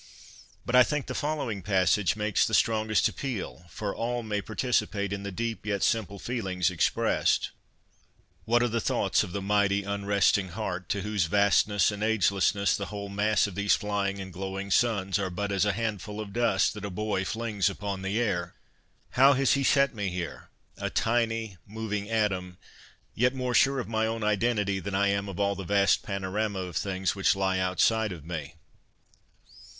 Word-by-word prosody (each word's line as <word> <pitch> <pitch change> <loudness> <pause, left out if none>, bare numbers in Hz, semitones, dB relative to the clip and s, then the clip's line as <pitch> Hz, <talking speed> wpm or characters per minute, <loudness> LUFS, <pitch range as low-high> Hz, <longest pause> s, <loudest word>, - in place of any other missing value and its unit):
But 120 - -3
I 125 - +9
think 150 +3 +1
the 130 - -5
following 145 -9 -2
passage 95 0 +2
makes 105 -1 +1
the 110 - +1
strongest 110 -1 +2
appeal, 110 - -5
for 100 +5 -4
all 120 +1 -2
may 105 -2 -2
participate 105 -3 -1
in 100 - -4
the 100 0 -5
deep 115 +4 -3
yet 100 -2 -1
simple 105 -3 0
feelings 95 -5 -1
expressed: 90 - +1 0.4
" - - -36
What 120 +1 +3
are - - +3
the 115 0 -1
thoughts - - +1
of - - -4
the 100 +1 -4
mighty 100 0 +2
unresting 100 -1 +1
heart, 95 -4 -4
to 100 - -1
whose 105 -4 0
vastness 100 +3 +3
and 105 0 -6
agelessness 100 -2 +2
the 100 - -4
whole 100 -1 -6
mass 105 +1 +2
of 100 - -5
these 100 +2 +2
flying 100 -2 -2
and 95 -1 -7
glowing 95 +2 -5
suns 100 -4 +2
are 95 -1 -1
but 100 +3 -3
as 100 0 +2
a 105 - +2
handful 105 -1 -3
of 105 -2 -6
dust 120 -5 +2
that 105 -1 -8
a 100 - -3
boy 105 0 -2
flings 110 -2 -1
upon 100 -2 -5
the 95 +4 -1
air? 90 -7 -1 0.6
How 135 +3 +6
has 135 0 +3
He 140 - +1
set 140 0 +3
me 100 -3 -2
here, 90 -2 -6 0.3
a - - -3
tiny 115 -3 0
moving 105 -1 -4
atom, 95 -5 -1 0.6
yet 125 +3 +1
more 125 -1 -2
sure 135 +3 +4
of 125 - -4
my 110 0 0
own 115 0 -3
identity 105 -2 +1
than 95 0 -4
I 100 +1 +3
am 100 0 -1
of 95 - -7
all 100 0 +2
the 95 0 -6
vast 100 +1 +3
panorama 100 +1 -2
of 90 -3 -5
things 95 -2 -1
which 95 -1 +2
lie 95 -1 0
outside 105 +4 +2
of 80 -5 -8
me 80 -2 -6
100 Hz, 185 wpm, -28 LUFS, 95-110 Hz, 0.6 s, I